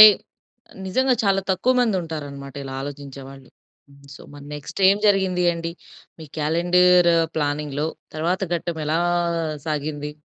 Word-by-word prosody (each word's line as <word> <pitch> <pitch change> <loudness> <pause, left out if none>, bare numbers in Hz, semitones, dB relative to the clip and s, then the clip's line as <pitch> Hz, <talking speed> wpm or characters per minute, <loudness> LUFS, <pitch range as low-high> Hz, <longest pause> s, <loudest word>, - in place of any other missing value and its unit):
అంటే 215 - +14 0.8
నిజంగా 260 +7 +2
చాలా 195 -1 +3
తక్కువ 190 +7 +2
మంది 225 -5 +2
ఉంటారన్నమాట 145 -4 -7
ఇలా 135 -1 -6
ఆలోచించేవాళ్ళు. 135 -1 -9 0.7
సొ - - -12
మరి 145 0 -11
నెక్స్ట్ 145 +5 -8
ఏం 200 - +2
జరిగింది 190 -3 +2
అండి? 165 0 -4 0.5
మీ 160 - -9
క్యాలెండర్ 175 +3 +4 0.3
ప్లానింగ్‌లో 145 0 -1 0.3
తర్వాత 170 +4 0
ఘట్టం 170 -1 -3
ఎలా 155 +2 +1 0.7
సాగింది? 150 -1 -3
160 Hz, 125 wpm, -23 LUFS, 145-180 Hz, 0.8 s, అంటే